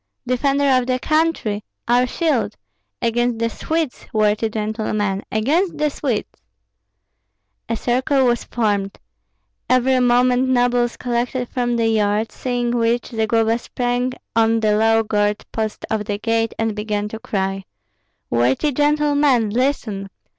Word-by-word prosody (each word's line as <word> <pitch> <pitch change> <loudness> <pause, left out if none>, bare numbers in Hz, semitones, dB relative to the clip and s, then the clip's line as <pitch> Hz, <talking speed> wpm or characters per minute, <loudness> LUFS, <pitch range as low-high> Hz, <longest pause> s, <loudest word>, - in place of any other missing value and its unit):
"Defender 275 +3 +1 0.2
of 250 - -4
the 255 0 +1
country! 305 -8 0 0.2
Our 245 +1 +3
shield! 245 - 0 0.5
Against 240 0 +1
the 230 0 -1
Swedes, 320 -1 -3
worthy 215 +1 +1
gentlemen, 215 -2 -2
against 305 - +1
the 300 -1 +1
Swedes!" 255 -7 -3 1.3
A 230 - 0
circle 260 +4 +1
was 240 -1 +1
formed. 205 -4 -1 0.7
Every 255 +1 +3
moment 250 +1 +3
nobles 245 -1 +2
collected 245 0 -2
from 240 -1 -1
the 230 -1 +1
yard; 215 0 +1
seeing 245 -2 -2
which, 235 0 0
Zagloba 225 0 +1
sprang 245 +1 -2 0.2
on 225 0 +3
the 210 -1 +3
low 225 +1 +3
guard 210 -1 0
post 220 -1 -3
of 215 -1 -1
the 205 -1 -2
gate, 225 +1 0
and 225 -1 0
began 210 -1 -2
to 220 - -7
cry, 195 -2 -2 0.7
"Worthy 125 - +2
gentlemen, 290 -5 +2
listen! 225 -5 -1
235 Hz, 130 wpm, -20 LUFS, 215-255 Hz, 1.3 s, Our